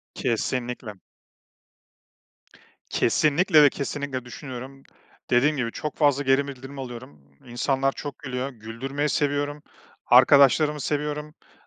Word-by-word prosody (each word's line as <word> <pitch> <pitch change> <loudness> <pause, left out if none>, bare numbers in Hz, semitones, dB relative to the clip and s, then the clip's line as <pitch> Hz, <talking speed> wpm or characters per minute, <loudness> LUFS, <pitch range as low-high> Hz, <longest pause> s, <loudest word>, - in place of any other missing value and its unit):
Kesinlikle. 120 -2 -3 1.9
Kesinlikle 155 +5 +3
ve 145 - +7
kesinlikle 140 -2 -4
düşünüyorum. 130 +1 -9 0.5
Dediğim 140 +5 +3
gibi 115 -3 -2
çok 150 - -5
fazla 145 -2 +3
geri 135 +1 +2
bildirim 135 +1 -9
alıyorum. 120 - -9 0.2
İnsanlar 135 +3 0
çok 145 0 -8
gülüyor, 130 -1 -4
güldürmeyi 130 +5 -4
seviyorum, 145 0 -1 0.4
arkadaşlarımı 140 +4 +5
seviyorum, 150 +1 -2
ııı, 150 +2 -22
135 Hz, 105 wpm, -24 LUFS, 125-145 Hz, 1.9 s, ve